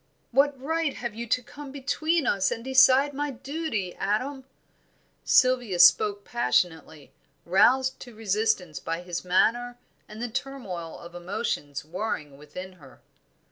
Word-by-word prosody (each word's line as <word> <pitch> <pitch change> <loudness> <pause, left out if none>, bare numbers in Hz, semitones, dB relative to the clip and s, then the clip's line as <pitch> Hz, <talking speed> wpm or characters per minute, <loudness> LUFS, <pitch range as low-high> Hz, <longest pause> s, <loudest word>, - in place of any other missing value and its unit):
"What 275 +2 +3
right 320 +1 -1
have 240 -3 -5
you 235 +2 -6
to 250 +2 +1
come 290 +2 -10
between 305 +3 0
us 190 -4 +2
and 230 - -4
decide 265 +2 +5
my 290 +1 -2
duty, 270 - -4
Adam?" 255 +7 -2 0.8
Sylvia 250 -7 +3
spoke 200 +4 +5
passionately, 160 -10 -1 0.3
roused 255 +9 +3
to 245 -3 -11
resistance 210 -7 0
by 165 +5 -4
his 175 -1 -5
manner 235 +7 +1 0.3
and 215 - -10
the 240 - -2
turmoil 225 - -5
of 170 0 -12
emotions 175 -6 -4
warring 155 -4 -4
within 180 +6 -9
her. 135 -2 -16
225 Hz, 135 wpm, -26 LUFS, 180-265 Hz, 0.8 s, decide